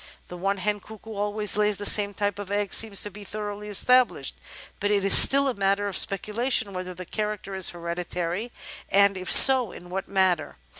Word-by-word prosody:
That 180 Hz, -, -10 dB
one 195 Hz, +3 st, -3 dB
hen 205 Hz, +2 st, -3 dB
cuckoo 220 Hz, +1 st, -13 dB
always 210 Hz, 0 st, -3 dB
lays 210 Hz, -1 st, 0 dB
the 205 Hz, -, -7 dB
same 205 Hz, -1 st, +2 dB
type 205 Hz, 0 st, -4 dB
of 200 Hz, -2 st, -8 dB
egg 205 Hz, -1 st, -3 dB
seems 215 Hz, -3 st, +2 dB
to 205 Hz, -, -2 dB
be 205 Hz, +2 st, -13 dB
thoroughly 210 Hz, 0 st, -8 dB
established, 250 Hz, +5 st, +1 dB, 0.5 s
but 205 Hz, -, -2 dB
it 200 Hz, -1 st, -1 dB
is 195 Hz, -, +7 dB
still 275 Hz, +1 st, +7 dB
a 260 Hz, -, -2 dB
matter 200 Hz, -1 st, -2 dB
of 200 Hz, -2 st, -5 dB
speculation 210 Hz, +2 st, -2 dB
whether 185 Hz, 0 st, -8 dB
the 185 Hz, +1 st, -10 dB
character 210 Hz, 0 st, -6 dB
is 190 Hz, -1 st, +1 dB
hereditary 175 Hz, +4 st, -6 dB, 0.4 s
and, 200 Hz, 0 st, +2 dB
if 185 Hz, -1 st, -4 dB
so, 260 Hz, -6 st, +7 dB
in 175 Hz, 0 st, -14 dB
what 190 Hz, +1 st, -6 dB
manner. 190 Hz, -, -2 dB
205 Hz, 195 wpm, -23 LUFS, 190-210 Hz, 0.5 s, is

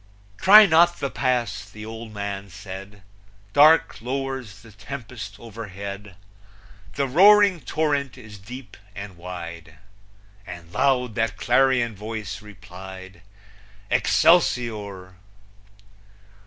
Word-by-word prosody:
"Try 210 Hz, +2 st, +9 dB
not 175 Hz, 0 st, +4 dB
the 140 Hz, -, -3 dB
Pass," 125 Hz, -5 st, -1 dB
the 105 Hz, 0 st, -10 dB
old 110 Hz, 0 st, -8 dB
man 100 Hz, -1 st, -5 dB
said; 95 Hz, +2 st, -10 dB, 0.5 s
"Dark 155 Hz, -3 st, +5 dB
lowers 130 Hz, -5 st, -5 dB
the 110 Hz, -, -15 dB
tempest 110 Hz, -1 st, -8 dB
overhead, 100 Hz, -3 st, -8 dB, 0.8 s
The 140 Hz, 0 st, 0 dB
roaring 200 Hz, +5 st, +6 dB
torrent 140 Hz, -2 st, -1 dB
is 105 Hz, -2 st, -12 dB
deep 120 Hz, +2 st, -11 dB, 0.2 s
and 100 Hz, -1 st, -8 dB
wide!" 85 Hz, -2 st, -9 dB, 0.7 s
And 85 Hz, -1 st, -10 dB
loud 130 Hz, -3 st, +1 dB
that 110 Hz, -3 st, -1 dB
clarion 120 Hz, -1 st, +2 dB
voice 110 Hz, +1 st, -6 dB
replied, 95 Hz, -3 st, -12 dB, 0.7 s
Excelsior! 105 Hz, -, +1 dB
110 Hz, 100 wpm, -23 LUFS, 100-135 Hz, 0.8 s, Try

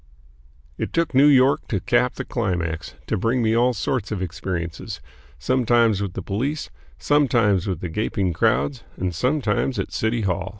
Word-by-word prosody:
It -, -, -3 dB
took 165 Hz, -2 st, 0 dB
New 135 Hz, +3 st, +6 dB
York 135 Hz, -1 st, +4 dB
to 100 Hz, -, -1 dB
cap -, -, +1 dB
the -, -, -5 dB
climax 85 Hz, -3 st, -2 dB
to -, -, -1 dB
bring 115 Hz, +4 st, +1 dB
me 110 Hz, 0 st, +2 dB
all 120 Hz, +2 st, +4 dB
sorts 125 Hz, +2 st, -2 dB
of 105 Hz, -, -2 dB
experiences, 85 Hz, -2 st, -4 dB, 0.4 s
sometimes 115 Hz, -, +2 dB
with 100 Hz, -3 st, -3 dB
the 95 Hz, -, -5 dB
police, 135 Hz, -, -3 dB, 0.3 s
sometimes 115 Hz, -, +2 dB
with 90 Hz, -4 st, -3 dB
the 90 Hz, -, -4 dB
gaping 95 Hz, 0 st, -1 dB
crowds, 70 Hz, -2 st, +1 dB
and 90 Hz, -1 st, -2 dB
sometimes 125 Hz, -, 0 dB
at -, -, -2 dB
the -, -, -15 dB
City 110 Hz, +1 st, 0 dB
Hall. 95 Hz, -2 st, -1 dB
105 Hz, 170 wpm, -23 LUFS, 90-125 Hz, 0.4 s, New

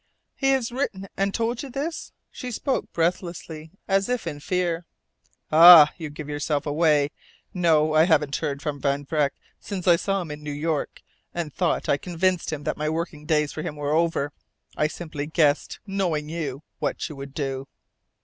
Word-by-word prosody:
"He 270 Hz, -, +1 dB
has 265 Hz, -4 st, +1 dB
written 235 Hz, -7 st, -3 dB
and 195 Hz, 0 st, 0 dB
told 230 Hz, +3 st, -1 dB
you 280 Hz, -, -7 dB
this!" 285 Hz, +6 st, -4 dB, 0.2 s
She 250 Hz, -, -6 dB
spoke 260 Hz, +3 st, -2 dB
breathlessly, 165 Hz, -2 st, -2 dB, 0.2 s
as 195 Hz, +2 st, +2 dB
if 250 Hz, -5 st, -1 dB
in 150 Hz, -3 st, -4 dB
fear. 175 Hz, 0 st, -1 dB, 0.6 s
"Ah, 160 Hz, -1 st, +10 dB
you 160 Hz, -4 st, -6 dB
give 150 Hz, 0 st, -8 dB
yourself 145 Hz, 0 st, -1 dB
away! 150 Hz, -1 st, +2 dB, 0.4 s
No, 160 Hz, -4 st, +3 dB
I 155 Hz, +1 st, +6 dB
haven't 150 Hz, -5 st, +2 dB
heard 145 Hz, -2 st, -3 dB
from 145 Hz, -3 st, -3 dB
Van 140 Hz, 0 st, 0 dB
Vreck 150 Hz, -1 st, +1 dB, 0.3 s
since 195 Hz, -3 st, -6 dB
I 170 Hz, -1 st, +7 dB
saw 195 Hz, +1 st, -1 dB
him 160 Hz, -, -8 dB
in 150 Hz, 0 st, -7 dB
New 150 Hz, 0 st, -5 dB
York, 155 Hz, 0 st, -2 dB, 0.3 s
and 165 Hz, -4 st, -3 dB
thought 175 Hz, -3 st, 0 dB
I 140 Hz, -, +3 dB
convinced 180 Hz, +1 st, -1 dB
him 150 Hz, -2 st, -4 dB
that -, -, -2 dB
my 155 Hz, 0 st, -1 dB
working 160 Hz, -2 st, -4 dB
days 150 Hz, -3 st, +2 dB
for 155 Hz, -, -5 dB
him 150 Hz, -, -5 dB
were 145 Hz, 0 st, -2 dB
over. 160 Hz, -3 st, +1 dB, 0.4 s
I 150 Hz, -, +2 dB
simply 155 Hz, -3 st, -6 dB
guessed 155 Hz, -2 st, +1 dB
knowing 180 Hz, -7 st, -1 dB
you 155 Hz, -4 st, -4 dB, 0.2 s
what -, -, -2 dB
you 155 Hz, -, -9 dB
would 135 Hz, 0 st, -9 dB
do." 135 Hz, -2 st, -3 dB
160 Hz, 180 wpm, -25 LUFS, 150-180 Hz, 0.6 s, Ah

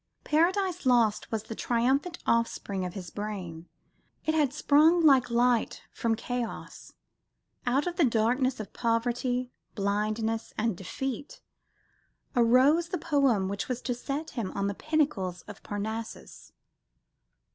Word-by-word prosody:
Paradise 360 Hz, +1 st, +1 dB
Lost 230 Hz, -4 st, +3 dB
was 220 Hz, -2 st, -2 dB
the 225 Hz, -, -7 dB
triumphant 265 Hz, +10 st, 0 dB
offspring 220 Hz, -4 st, 0 dB
of 180 Hz, -, -6 dB
his 180 Hz, -4 st, -7 dB
brain. 185 Hz, -6 st, -6 dB, 0.6 s
It 315 Hz, -, +1 dB
had 300 Hz, -5 st, +2 dB
sprung, 310 Hz, +4 st, +4 dB
like 265 Hz, -4 st, +5 dB
light, 240 Hz, 0 st, +1 dB
from 230 Hz, -1 st, 0 dB
chaos. 245 Hz, +1 st, -5 dB, 0.7 s
Out 270 Hz, +4 st, +2 dB
of 355 Hz, -1 st, -3 dB
the 345 Hz, -, +4 dB
darkness 245 Hz, +2 st, +1 dB
of 215 Hz, -, -7 dB
poverty, 245 Hz, +2 st, -1 dB, 0.2 s
blindness 215 Hz, +2 st, -1 dB
and 220 Hz, -2 st, 0 dB
defeat 265 Hz, -, -5 dB, 0.9 s
arose 260 Hz, +8 st, +4 dB
the 360 Hz, -, -1 dB
poem 280 Hz, -, +2 dB
which 200 Hz, +1 st, -3 dB
was 250 Hz, -1 st, -2 dB
to 250 Hz, -, -1 dB
set 280 Hz, +5 st, -4 dB
him 225 Hz, -7 st, -3 dB
on 200 Hz, -, -1 dB
the 200 Hz, -, -1 dB
pinnacles 250 Hz, -, -1 dB
of 205 Hz, -1 st, -11 dB
Parnassus. 220 Hz, +2 st, -6 dB
240 Hz, 130 wpm, -28 LUFS, 215-285 Hz, 0.9 s, like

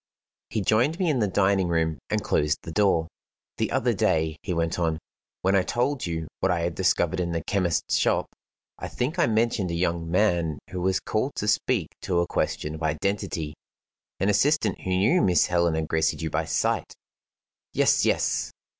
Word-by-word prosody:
He 110 Hz, -, -1 dB
joined 120 Hz, -, +2 dB
me 180 Hz, -4 st, +1 dB
in 135 Hz, -, 0 dB
the 105 Hz, -, +2 dB
dining 95 Hz, -1 st, +2 dB
room, 80 Hz, -3 st, 0 dB
and -, -, 0 dB
closed 75 Hz, 0 st, 0 dB
the 85 Hz, -, -7 dB
door. 85 Hz, -3 st, +2 dB, 0.5 s
"The -, -, +1 dB
other -, -, +1 dB
day," 80 Hz, -1 st, +1 dB
he -, -, -4 dB
went 85 Hz, 0 st, -1 dB
on, 80 Hz, -2 st, 0 dB, 0.5 s
"when 95 Hz, +2 st, +3 dB
I 95 Hz, -, +5 dB
told 125 Hz, +4 st, -1 dB
you 80 Hz, -2 st, -3 dB
what -, -, +1 dB
I 85 Hz, -1 st, 0 dB
had 85 Hz, 0 st, -1 dB
discovered -, -, +1 dB
in 85 Hz, -1 st, -1 dB
the 85 Hz, -, -2 dB
chemist's 90 Hz, -5 st, 0 dB
shop, -, -, +2 dB, 0.5 s
I -, -, -4 dB
think 150 Hz, +8 st, -3 dB
I -, -, +4 dB
mentioned 110 Hz, -4 st, +1 dB
a 85 Hz, -, -2 dB
young 85 Hz, -1 st, -1 dB
man 85 Hz, -5 st, +1 dB
who 90 Hz, -, -4 dB
was 95 Hz, +1 st, +1 dB
called 130 Hz, +6 st, -2 dB
to 105 Hz, -, -3 dB
speak 105 Hz, -4 st, +1 dB
to 90 Hz, -3 st, -1 dB
a 85 Hz, -, +2 dB
question 75 Hz, -2 st, -2 dB
of 80 Hz, -, -8 dB
identity 80 Hz, -1 st, -2 dB, 0.7 s
an 95 Hz, -, +1 dB
assistant 110 Hz, +1 st, +2 dB
who -, -, -5 dB
knew 100 Hz, -, +3 dB
Miss 90 Hz, -2 st, +4 dB
Helena 85 Hz, -2 st, +1 dB
Gracedieu 80 Hz, 0 st, 0 dB
by 80 Hz, +1 st, 0 dB
sight." 80 Hz, -, -1 dB, 0.8 s
"Yes, -, -, +3 dB
yes!" -, -, +1 dB
90 Hz, 180 wpm, -25 LUFS, 80-105 Hz, 0.8 s, I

